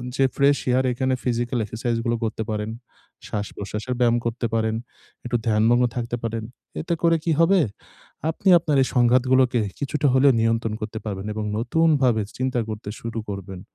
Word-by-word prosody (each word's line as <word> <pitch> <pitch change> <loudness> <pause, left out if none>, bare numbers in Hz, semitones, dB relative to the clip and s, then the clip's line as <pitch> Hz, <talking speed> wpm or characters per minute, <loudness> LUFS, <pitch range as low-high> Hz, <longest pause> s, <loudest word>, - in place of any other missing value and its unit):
যে 135 - +2
fresh 140 +1 +4
air, 130 +1 +3
এখানে 130 +2 0
physical 120 0 -1
এক্সারসাইজগুলো 115 +2 -2
করতে 110 0 -2
পারেন, 105 0 -2 0.6
শ্বাস-প্রশ্বাসের 105 +3 -4
ব্যায়াম 120 -1 +4
করতে 115 +1 -2
পারেন, 110 -1 +1 0.5
একটু 120 0 -2
ধ্যানমগ্ন 115 +3 +4
থাকতে 120 -1 -2
পারেন। 115 -1 -3 0.4
এতে 170 +2 -2
করে 165 -1 +4
কি 165 - +2
হবে? 185 +3 +5 0.7
আপনি 190 +4 0
আপনার 155 -4 0
এই - - -2
সংঘাতগুলোকে 125 0 +4 0.2
কিছুটা 145 +1 0
হলেও 135 +1 +6
নিয়ন্ত্রণ 115 -1 +1
করতে 110 0 -5
পারবেন 100 -2 -4
এবং 110 0 -3
নতুনভাবে 130 -2 +2 0.2
চিন্তা 130 -1 0
করতে 105 -1 -6
শুরু 115 -1 -5
করবেন। 95 -2 -6
120 Hz, 155 wpm, -23 LUFS, 110-130 Hz, 0.7 s, হলেও